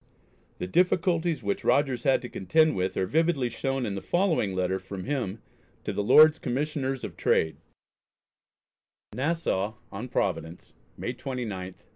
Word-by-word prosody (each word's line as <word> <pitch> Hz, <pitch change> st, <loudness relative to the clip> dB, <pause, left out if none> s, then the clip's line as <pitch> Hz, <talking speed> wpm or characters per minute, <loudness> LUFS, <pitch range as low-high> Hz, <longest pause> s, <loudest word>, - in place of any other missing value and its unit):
The -, -, -3 dB
difficulties 170 Hz, -, +1 dB
which 100 Hz, 0 st, -2 dB
Rogers 135 Hz, -4 st, +2 dB
had 135 Hz, -1 st, +3 dB
to -, -, -4 dB
contend 155 Hz, -, +2 dB
with 95 Hz, 0 st, -1 dB
are 95 Hz, -, +1 dB
vividly 150 Hz, -, +1 dB
shown 135 Hz, +2 st, -2 dB
in 105 Hz, -, -2 dB
the 100 Hz, -, -4 dB
following 165 Hz, -, +1 dB
letter 95 Hz, +1 st, 0 dB
from 95 Hz, 0 st, -7 dB
him 115 Hz, -6 st, -3 dB, 0.4 s
to -, -, -3 dB
the -, -, -1 dB
Lords 155 Hz, +7 st, +7 dB
Commissioners 135 Hz, 0 st, -2 dB
of -, -, -6 dB
Trade: 80 Hz, -1 st, +1 dB, 1.6 s
NASSAU 125 Hz, -, -1 dB, 0.2 s
ON 110 Hz, +5 st, -6 dB
PROVIDENCE, 85 Hz, -6 st, -2 dB, 0.2 s
May -, -, -3 dB
29, 125 Hz, -4 st, -4 dB
1719. 95 Hz, -2 st, -8 dB
125 Hz, 145 wpm, -27 LUFS, 95-150 Hz, 1.6 s, Lords